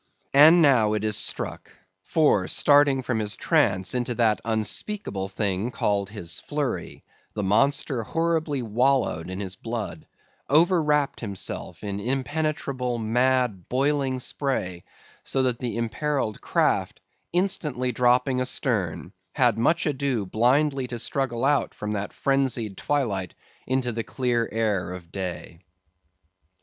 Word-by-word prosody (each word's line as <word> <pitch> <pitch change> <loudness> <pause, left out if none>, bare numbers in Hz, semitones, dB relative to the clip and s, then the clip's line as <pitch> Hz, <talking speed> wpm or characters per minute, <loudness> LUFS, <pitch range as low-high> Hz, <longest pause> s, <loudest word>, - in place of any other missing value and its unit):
And 160 +5 +8
now 120 -7 +4
it 105 -1 -1
is 105 -1 +2
struck; - - 0 0.3
for, 105 - +2
starting 145 -2 +4
from 120 -2 -1
his 105 -1 -1
trance 95 0 +1
into 125 -1 -1
that 110 -3 +2
unspeakable 110 - -2
thing 100 +2 -2
called 100 -4 -1
his 85 -6 -4
"flurry," - - -4 0.3
the 105 - -2
monster 125 +5 +2
horribly 160 0 -1
wallowed 120 -6 +1
in 95 +1 -5
his 95 -2 -4
blood, 115 +2 -6 0.4
overwrapped 150 -2 +3
himself 100 -2 -5
in 100 -1 -4
impenetrable, 135 0 -2
mad, 120 -3 0
boiling 135 0 +1
spray, 120 -10 -3 0.4
so 135 - 0
that 125 -2 0
the 120 -3 -3
imperilled 115 0 -2
craft, - - 0 0.3
instantly 155 -9 0
dropping 125 +2 +2
astern, 105 - -1 0.2
had 120 -4 +3
much 160 +9 +2
ado 135 -7 -1
blindly 130 +6 +1
to 120 - -5
struggle 130 0 -1
out 145 0 +1
from 105 0 -4
that 100 -1 -3
phrensied 130 -7 0
twilight 105 - -2 0.3
into 130 -1 0
the 115 0 -3
clear 120 -2 -1
air 105 -5 0
of 90 -1 -8
the 85 - -27
day. 90 -3 -6
120 Hz, 130 wpm, -25 LUFS, 105-140 Hz, 0.4 s, And